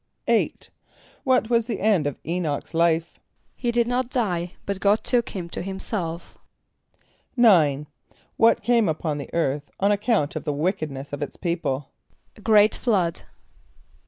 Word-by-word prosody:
= - - -49
=8.= - - 0 0.5
What 255 -3 +2
was 230 -1 +2
the 225 -5 -3
end 195 -8 +2
of 145 - -4
[=E]´n[)o]ch's 165 -4 -3
life? 165 0 +1 0.4
=He 240 - -1
did 235 0 +2
not 250 0 0
die, 180 -9 -1
but 200 -1 -3
God 205 +2 +2
took 240 -2 +1
him 180 -4 -5
to - - -4
himself.= 185 -3 -5 1.0
=9.= 155 - +5 0.5
What 230 -1 +4
came 230 -4 +3
upon 155 -1 -2
the 140 - -7
earth 145 -3 -1
on 200 +1 +3
account 205 -7 +1
of 155 - -4
the 150 - -1
wickedness 150 -4 -3
of 145 - -4
its - - -5
people? 155 -6 -2 0.4
=A 215 - -16
great 210 -1 +5
flood. 185 -9 0
180 Hz, 155 wpm, -24 LUFS, 160-220 Hz, 1.0 s, =9.=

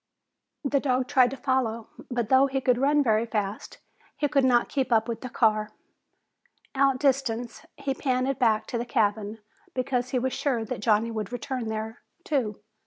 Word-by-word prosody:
The 280 0 +1
dog 255 -2 0
tried 255 -4 +4
to 270 - -7
follow, 250 -4 -1 0.2
but 240 -3 -2
though 265 +1 +5
he 270 0 -1
could 250 -2 +2
run 290 +2 +3
very 225 -1 +2
fast, 210 -2 -3 0.4
he 295 - +1
could 275 -1 +2
not 245 -2 +4
keep 265 -2 -2
up 225 0 +3
with 230 -1 -4
the 255 - -6
car. 215 -3 +2 1.1
Outdistanced, 265 -3 +1
he 270 - -2
panted 260 0 -1
back 220 -3 +2
to 235 - -3
the 240 - -3
cabin 215 -3 0 0.4
because 255 -1 -1
he 255 - 0
was 255 +1 -1
sure 250 -7 -1
that - - -4
Johnny 220 +2 +2
would 215 -2 -4
return 250 -1 -4
there, 220 +1 -5 0.2
too. 235 -10 -1
245 Hz, 175 wpm, -26 LUFS, 225-265 Hz, 1.1 s, though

